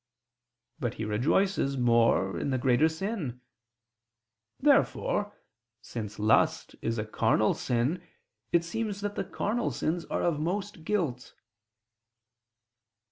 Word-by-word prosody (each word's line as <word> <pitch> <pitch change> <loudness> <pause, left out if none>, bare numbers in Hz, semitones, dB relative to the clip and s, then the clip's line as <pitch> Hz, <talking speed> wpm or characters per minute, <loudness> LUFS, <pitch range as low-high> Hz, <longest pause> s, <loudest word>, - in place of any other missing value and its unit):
But 120 -6 -2
he 110 - -4
rejoices 135 - +1
more 115 -5 +3
in - - -2
the 130 - +1
greater 130 +5 +3
sin. 160 - -4 1.2
Therefore, 265 -7 +2 0.4
since 110 -1 -6
lust 105 +1 +2
is 115 0 -1
a 110 - -2
carnal 110 0 +2
sin, 125 +8 0 0.5
it 170 -1 +3
seems 205 +3 -3
that 205 0 -2
the - - -2
carnal 235 +3 -1
sins 170 +2 -2
are - - -2
of 165 -4 +1
most 185 +2 -3
guilt. 155 - -2
150 Hz, 115 wpm, -29 LUFS, -, 1.2 s, more